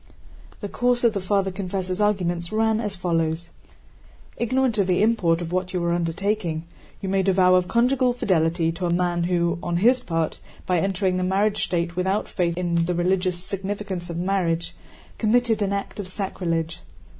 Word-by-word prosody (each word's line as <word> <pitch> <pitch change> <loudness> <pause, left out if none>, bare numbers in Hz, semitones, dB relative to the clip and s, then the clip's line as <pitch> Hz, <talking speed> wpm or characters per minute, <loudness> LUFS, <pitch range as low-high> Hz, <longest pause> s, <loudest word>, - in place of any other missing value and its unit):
The 205 - -3
course 245 +3 +1
of 235 -2 +4
the 200 - -2
Father 195 0 +1
Confessor's 185 0 -3
arguments 175 -5 0
ran 220 0 +2
as 205 -3 -3
follows: 170 -2 -1 0.8
"Ignorant 245 -1 +1
of 195 - +2
the 185 +2 +2
import 180 -7 +2
of 170 -1 -5
what 185 +1 -2
you 180 - 0
were 170 0 0
undertaking, 175 0 -1 0.4
you 195 - -4
made 190 0 +1
a - - +4
vow 185 -1 +5
of 180 -1 +3
conjugal 250 +3 +2
fidelity 165 -7 +1
to 175 +2 -3
a - - 0
man 175 -1 +1
who 170 -1 +1
on 175 -1 -1
his 245 +7 +4
part, 165 -5 -2 0.3
by 180 -2 +2
entering 190 0 0
the 185 - 0
married 200 +3 +1
state 170 -1 -1
without 190 +3 0
faith 170 -2 -1
in 170 -2 +1
the 180 +1 -1
religious 180 0 0
significance 195 -2 -4
of 170 - -4
marriage, 175 -2 0 0.5
committed 225 0 +2
an 200 -1 +1
act 200 +1 -4
of 200 - -4
sacrilege. 170 -4 -2
185 Hz, 180 wpm, -24 LUFS, 170-205 Hz, 0.8 s, vow